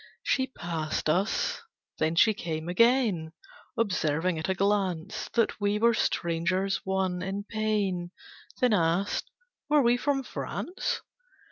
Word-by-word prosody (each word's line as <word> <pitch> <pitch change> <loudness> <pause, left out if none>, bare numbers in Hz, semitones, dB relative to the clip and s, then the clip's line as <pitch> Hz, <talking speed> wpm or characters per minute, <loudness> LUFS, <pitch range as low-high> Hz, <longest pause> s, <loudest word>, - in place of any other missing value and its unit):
She 265 -1 +1
past 160 -9 -2
us, 190 +6 0 0.4
then 160 +1 +1
she 220 +5 +5
came 160 -5 -4
again, 200 -5 +3 0.4
Observing 180 -5 +1
at 160 - -3
a 190 - +1
glance 195 -1 0
That 230 -2 +1
we 205 +1 +2
were 235 +2 +4
strangers; 185 +1 0
one, 190 -2 -1
in 195 +2 -3
pain, 205 -5 -1 0.5
Then 250 -4 +3
asked, 175 +2 +1 0.4
Were 295 -1 +5
we 240 +1 +4
from 270 +1 0
France? 350 +7 -3
195 Hz, 125 wpm, -28 LUFS, 170-220 Hz, 0.5 s, she